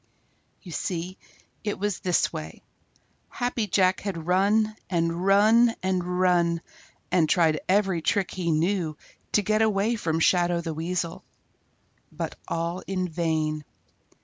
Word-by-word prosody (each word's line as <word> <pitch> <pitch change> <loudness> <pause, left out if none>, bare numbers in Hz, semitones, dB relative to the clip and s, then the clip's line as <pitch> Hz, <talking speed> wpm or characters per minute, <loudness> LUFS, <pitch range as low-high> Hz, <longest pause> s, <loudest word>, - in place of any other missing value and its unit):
You 180 - -10
see, 180 +3 -4 0.4
it 205 -1 -2
was 205 -1 -2
this 180 -2 +1
way: 80 +1 -7 0.7
Happy 245 -3 -2
Jack 185 -1 +3
had 175 -6 -5
run 205 +4 +2
and 170 0 0
run 220 +4 +5
and 180 -1 -1
run 170 -2 +2 0.5
and 165 -4 +3
tried 160 -4 +3
every 190 -3 +2
trick 190 +3 0
he 180 -2 -2
knew 165 -1 0 0.4
to 210 - +3
get 215 +2 +1
away 215 +1 +2
from 165 -7 -1
Shadow 175 0 +3
the 165 -1 -4
Weasel, 170 +1 -3 0.9
but - - -5
all 170 +2 -2
in 185 -2 -2
vain. 155 -2 -1
180 Hz, 130 wpm, -26 LUFS, 165-200 Hz, 0.9 s, run